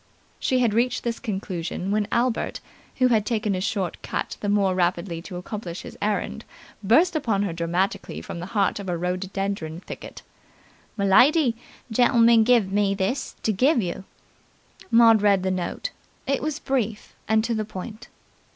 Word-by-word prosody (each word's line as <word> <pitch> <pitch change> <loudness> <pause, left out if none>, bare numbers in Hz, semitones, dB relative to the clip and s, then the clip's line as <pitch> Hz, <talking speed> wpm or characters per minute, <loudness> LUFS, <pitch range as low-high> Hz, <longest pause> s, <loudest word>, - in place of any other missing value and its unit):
She 260 - +1
had 240 -4 +2
reached 240 +2 +1
this 235 -1 -2
conclusion 190 -4 -4
when 210 0 +1
Albert, 240 -1 0 0.4
who 255 -1 +3
had 220 -3 +3
taken 215 -2 -1
a 185 - -2
short 190 -3 -2
cut - - -3
the 205 - -1
more 200 -2 +2
rapidly 175 -1 -1
to 180 +1 -9
accomplish 180 -1 -6
his - - -9
errand, 205 0 -1 0.4
burst 320 - +4
upon 220 -9 +1
her 190 -5 -2
dramatically 175 +5 -2
from - - -7
the 175 - -6
heart 200 0 +2
of 195 -2 -6
a 175 - -1
rhododendron 185 -1 -3
thicket. - - -9 0.7
"M'lady! 245 - +5 0.4
Gentleman 230 -1 +5
give 225 -5 +3
me 200 0 +2
this 215 +7 -2
to 220 - +1
give 255 +8 +3
yer!" 180 -2 -3 0.9
Maud 230 -2 +6
read 200 -2 +3
the 190 - 0
note. 185 - -3 0.3
It 275 0 0
was 305 0 -2
brief, 235 -8 -2
and 220 0 +3
to 235 +1 -1
the 215 -1 -1
point. 215 +2 -8
205 Hz, 160 wpm, -24 LUFS, 190-235 Hz, 0.9 s, Maud